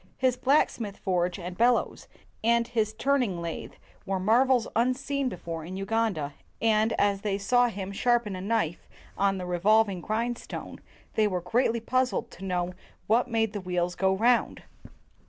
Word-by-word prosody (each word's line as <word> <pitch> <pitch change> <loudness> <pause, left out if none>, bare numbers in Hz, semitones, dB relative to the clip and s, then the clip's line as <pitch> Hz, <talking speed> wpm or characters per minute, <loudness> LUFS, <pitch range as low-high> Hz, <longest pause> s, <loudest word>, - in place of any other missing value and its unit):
His 255 -2 +2
blacksmith's 245 -6 +1
forge 180 -1 0
and 180 -1 -6
bellows 240 +4 +1 0.4
and 235 +1 +3
his 220 -3 0
turn 275 +5 +1
ing 190 -8 -2
lathe 170 -1 -5 0.3
were 195 -2 -2
marvels 240 +4 +3
unseen 260 +3 0
before 165 -5 -6
in 185 +4 -6
Uganda; 195 -8 -1 0.3
and, 220 0 +2
as 200 -1 +1
they 200 -2 -1
saw 245 +5 +3
him 195 -4 -5
sharpen 235 -1 +1
a 185 - -6
knife 195 -5 -1 0.3
on 195 -1 +1
the 180 - -4
revolving 195 +2 +2
grindstone, 230 +5 -4 0.3
they 215 -1 +3
were 185 -3 -2
greatly 230 +5 +1
puzzled 255 +3 0
to 190 - -12
know 180 -1 -1 0.3
what 235 +4 +2
made 225 -3 0
the 205 - -4
wheels 180 -1 -1
go 190 +1 +1
round. 235 +4 +2
215 Hz, 155 wpm, -27 LUFS, 185-235 Hz, 0.4 s, and